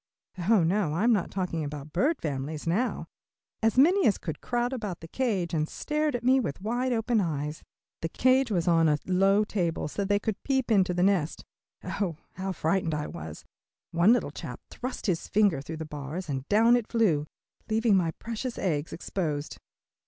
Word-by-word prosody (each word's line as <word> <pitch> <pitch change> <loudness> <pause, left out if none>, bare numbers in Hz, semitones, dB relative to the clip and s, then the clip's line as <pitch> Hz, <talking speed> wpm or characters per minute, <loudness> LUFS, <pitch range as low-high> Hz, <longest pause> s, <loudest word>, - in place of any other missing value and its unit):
Oh, 215 -6 +5
no, 170 -2 +1
I'm 230 +7 +3
not 200 -5 0
talking 180 -4 -2
about 145 0 -7
bird 280 - +2
families 145 0 -4
now. 205 +10 0 0.6
As 225 +2 +2
many 355 +8 +5
as 205 - +3
could 160 -4 -6
crowded 245 +1 -1
about 205 -7 -5
the 165 - -10
cage 195 -6 -1
and 155 -1 0
stared 300 -2 -1
at 240 - -3
me 260 +2 +5
with 145 - -3
wide 240 +6 -1
open 225 -1 +1
eyes. 150 -3 -3 0.4
The 165 - -2
cage 260 +5 +3
was 180 -4 0
on 165 -2 +4
a 150 - +3
low 195 +3 +3
table 175 -7 -1
so 200 +6 -3
they 205 +1 +2
could 210 0 -3
peep 265 -4 0
into 185 -4 +3
the 180 - +2
nest. 185 -5 +1 0.4
Oh, 180 -7 -2 0.2
how 190 +1 -3
frightened 165 -1 0
I 150 0 -2
was. 80 -1 -8 0.5
One 170 +6 +5
little 245 - +2
chap - - -7
thrust 255 +1 -5
his 180 -5 0
finger 200 -9 +3
through 160 +3 -7
the 160 - -5
bars, 150 +4 -6
and 135 -1 -4
down 225 +3 +5
I 245 - +3
flew, 175 -11 +2 0.4
leaving 220 -1 +3
my 175 -3 +2
precious 230 +2 -5
eggs 155 -5 -1
exposed. 155 -5 -3
190 Hz, 185 wpm, -28 LUFS, 160-230 Hz, 0.6 s, Oh